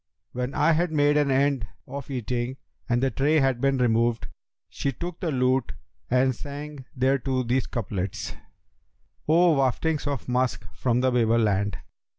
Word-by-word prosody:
When 125 +2 -3
I 150 +3 +4
had 170 +1 +1
made 145 -1 +3
an 145 -1 +3
end 135 -4 +2 0.2
of 140 -1 -7
eating 125 0 -3 0.3
and 120 +1 +2
the 135 - +2
tray 150 +3 +2
had 135 -3 +1
been 135 0 +2
re 125 - +3
moved, 115 0 +1 0.4
she 140 - -2
took 170 +5 -6
the 175 - -2
lute 130 -2 +1 0.4
and 130 +1 +3
sang 145 +1 -8
thereto 130 0 +1
these 125 +2 0
couplets, 100 -4 -4 1.0
'O 165 -1 +5
waftings 145 +3 0
of 140 -4 -3
musk 125 0 0
from 125 -1 0
the 130 0 +2
Babel 115 -2 +3
land! 100 -3 +1
130 Hz, 160 wpm, -25 LUFS, 120-145 Hz, 1.0 s, O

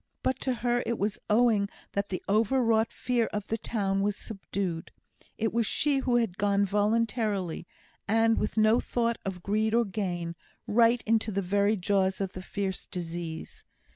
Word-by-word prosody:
But 260 0 0
to 260 -2 -1
her 240 +1 +1
it 235 - 0
was 205 +1 -1
owing 215 -2 +3 0.2
that 200 0 -2
the 185 - -4
overwrought 225 +1 +2
fear 240 -2 0
of 210 -1 -4
the 225 - 0
town 195 -4 -1
was 205 0 +1
subdued; 195 -6 -4 0.5
it 225 -1 -1
was 230 -2 +1
she 285 -2 +2
who 255 -2 +1
had 225 -5 0
gone 200 0 +3
voluntarily, 205 -3 0 0.4
and, 225 +2 +3
with 210 - -2
no 215 +2 +5
thought 235 -1 -1
of 185 -2 -5
greed 215 +2 +1
or 235 0 +4
gain, 175 -4 -3 0.3
right 230 +2 +4
into 220 0 +2
the 200 0 -1
very 200 +3 +2
jaws 190 0 +1
of 195 -2 -2
the 185 - -6
fierce 190 0 -4
disease. 170 -2 -6
210 Hz, 170 wpm, -28 LUFS, 195-230 Hz, 0.5 s, no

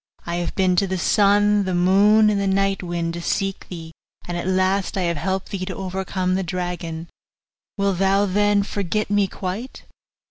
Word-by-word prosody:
I 170 0 -2
have 175 -1 -3
been 185 -2 +2
to 195 - +3
the 190 0 -2
sun, 205 +2 +3
the 185 -1 -1
moon, 205 +4 +5
and 200 -1 0
the 200 - 0
night 195 0 +1
wind, 170 -2 -3
to 170 - -5
seek 195 +2 -2
thee, 165 -3 -8 0.4
and 175 - -3
at 175 +1 -3
last 190 +1 +1
I 190 - 0
have 170 -2 0
helped 190 +5 -2
thee 195 -3 -3
to 185 -1 -5
overcome 185 0 -2
the 190 - +1
dragon. 175 -2 -4 0.7
Wilt 200 -2 0
thou 195 +1 +3
then 205 +1 +2
forget 205 +1 -2
me 205 -1 +3
quite? 195 +7 -6
190 Hz, 185 wpm, -22 LUFS, 180-200 Hz, 0.7 s, moon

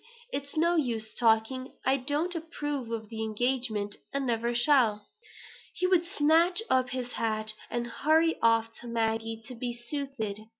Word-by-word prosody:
it's 285 +2 -4
no 340 +2 +3
use 230 -8 -1
talking. 235 +3 +2
I 265 +1 +4
don't 295 +7 -1
approve 295 -6 -4
of 220 -2 -4
the 220 -1 -5
engagement; 220 -2 -1
and 275 -1 -1
never 235 0 0
shall." 240 -5 +3 0.7
He 365 - 0
would 365 -2 +4
snatch 335 +6 +3
up 255 -1 +3
his 250 -1 -3
hat, 215 -2 -1 0.2
and 240 0 -2
hurry 315 +7 +2
off 230 0 +3
to 240 - -10
Maggie 225 -1 -1
to 250 - -6
be 240 0 -3
soothed. 240 -4 -4
245 Hz, 155 wpm, -29 LUFS, 225-290 Hz, 0.7 s, I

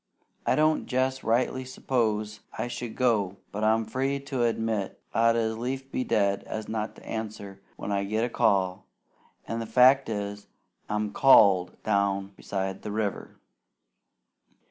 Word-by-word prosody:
"I - - +4
don't 155 0 +2
jest 130 +1 0
rightly 125 +3 +1
s'pose 110 -5 -1 0.2
I - - -2
should 120 -2 -6
go; 105 -7 +1
but 105 +1 -4
I'm 110 +1 +3
free 135 +5 -1
to 135 -2 -3
admit 110 -3 -1
I'd 115 +1 +4
as 110 -1 0
lief 135 +2 -4
be 130 - -1
dead 100 -4 +1
as 110 -1 -5
not 110 0 -3
to - - -15
answer 105 -3 -6
when 100 - -5
I 100 0 0
get 110 +3 0
a - - -3
call, 95 -5 +1 0.6
an' 115 - -3
the 115 - -4
fact 130 +4 +5
is, 100 -1 -4 0.4
I'm 105 -1 -1
CALLED 100 -9 +5
down 100 -2 +1
beside 95 -1 -4
the 105 - -5
river." 105 -2 -3
110 Hz, 150 wpm, -27 LUFS, 100-125 Hz, 0.6 s, fact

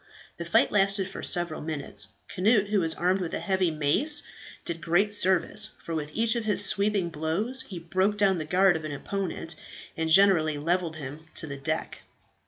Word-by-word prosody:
The - - -6
fight - - +3
lasted 195 -1 +2
for - - -7
several 175 -3 +2
minutes. 150 -2 -2 0.3
Cnut 205 +1 +2
who 210 -1 +2
was 165 -2 +1
armed 185 +2 +1
with 175 - -3
a - - -3
heavy 190 -3 +1
mace, 160 - +2 0.4
did 165 -1 -4
great 175 +6 +1
service, 205 +2 +1
for 165 - -5
with 150 -2 -3
each 225 +1 +2
of 235 -2 -2
his 205 -1 +2
sweeping 200 -2 +1
blows 170 - -2
he 190 - -8
broke 185 +5 0
down 195 -4 +2
the 155 - -4
guard 185 +3 +3
of 160 - -4
an 155 -1 -5
opponent, 175 +1 -4 0.4
and 160 0 -2
generally 160 -4 +4
levelled 170 +2 -1
him 150 +2 -9
to - - -1
the 140 -3 -6
deck. 135 - -3
180 Hz, 190 wpm, -27 LUFS, 160-200 Hz, 0.4 s, generally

